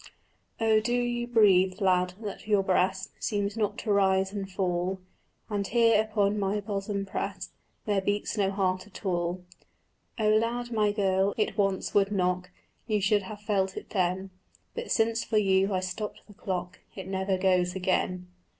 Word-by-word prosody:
"Oh 220 -1 +4
do 240 +3 0
you 240 -1 -1
breathe, 195 -5 +4
lad, 180 -2 +2
that 205 0 -6
your 205 -2 +3
breast 190 0 +1
Seems 205 -1 -1
not 215 -3 -1
to 215 - -2
rise 190 -1 +2
and 195 -2 -4
fall, 185 0 -1 0.5
And 205 -2 -2
here 230 -2 +4
upon 210 -1 0
my 200 +1 0
bosom 200 -1 -3
prest 190 -1 -4 0.3
There 205 -2 +1
beats 205 +2 -1
no 200 -3 +1
heart 190 -1 -1
at 205 +1 -12
all?" 175 0 -1 0.7
"Oh 215 -2 +2
loud, 235 +3 +1
my 210 -2 +2
girl, 195 -1 +1
it 210 -3 0
once 195 -2 0
would 200 0 +3
knock, 180 -2 0 0.4
You 215 -2 +1
should 205 +1 +2
have 210 +2 -9
felt 195 -3 0
it - - -8
then; 185 0 -1 0.4
But 475 0 -5
since 225 0 +2
for 220 - 0
you 195 -1 +3
I 185 -1 0
stopped 185 +3 -5
the 205 - -15
clock 185 -2 -4 0.2
It 190 -2 -7
never 190 0 -1
goes 185 -1 +2
again." 185 -1 0
195 Hz, 170 wpm, -28 LUFS, 190-210 Hz, 0.7 s, Oh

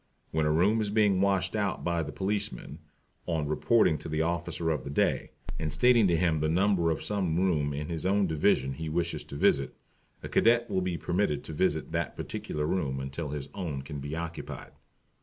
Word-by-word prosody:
When 80 -1 +1
a - - +2
room 100 +8 +3
is 105 - -1
being 105 -3 +3
washed 100 +1 +1
out 100 -2 -1
by 85 -1 0
the 75 -1 -4
policeman, 95 -5 -3 0.5
on 80 -4 0
reporting 80 +2 +3
to - - -7
the 80 +1 0
Officer 85 0 -1
of 75 -5 -2
the 70 - -6
Day, 70 - +1 0.3
and 80 -1 -2
stating 115 +7 +5
to 85 -2 +2
him 80 -2 +2
the 75 +1 +1
number 90 0 +2
of 80 - -1
some 95 -6 0
room 80 -6 +1
in 75 +1 -4
his 80 -1 -4
own 100 +2 +2
Division 75 -5 +2
he 80 +3 -5
wishes 85 +2 -1
to - - -9
visit, 70 -2 +2 0.5
a - - -4
Cadet 120 +1 +3
will 95 - +1
be 90 -2 -2
permitted 85 -2 0
to - - -7
visit - - 0
that - - -2
particular 75 0 -4
room 70 -6 -1
until 70 +3 -4
his 70 -1 -5
own 80 -8 -4
can 70 +1 -6
be 70 +3 -5
occupied. 85 0 -6
85 Hz, 200 wpm, -29 LUFS, 75-95 Hz, 0.5 s, stating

